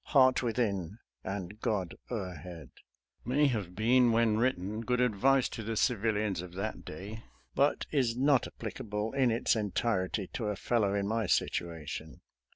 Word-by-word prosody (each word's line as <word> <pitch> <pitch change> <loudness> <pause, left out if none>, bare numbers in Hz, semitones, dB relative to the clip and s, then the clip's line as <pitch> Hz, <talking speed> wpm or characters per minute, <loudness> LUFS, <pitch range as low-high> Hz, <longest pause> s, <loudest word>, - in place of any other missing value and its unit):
Heart 130 -3 +5
within 105 -6 -1 0.3
and 95 +1 -5
God 95 -7 -1 0.2
o'erhead! 90 - -6 0.3
" - - -63 0.2
may 140 +5 +2
have 105 -10 -1
been, 120 +3 +4
when 115 -1 +3
written, 110 -3 0
good 125 +1 0
advice 125 +3 +3
to 115 - -6
the 110 +1 -3
civilians 105 -6 +1
of 90 -1 -9
that 105 +3 -4
day, 100 +8 -8 0.3
but 140 +1 +2
is 125 -5 +1
not 135 -1 +3
applicable 105 +1 -4
in 135 -2 +3
its 115 +1 +2
entirety 105 -2 0
to 115 - -3
a 105 - -1
fellow 100 -1 +1
in 100 -1 0
my 110 -1 0
situation. 80 -2 -2
110 Hz, 155 wpm, -31 LUFS, 95-120 Hz, 0.3 s, Heart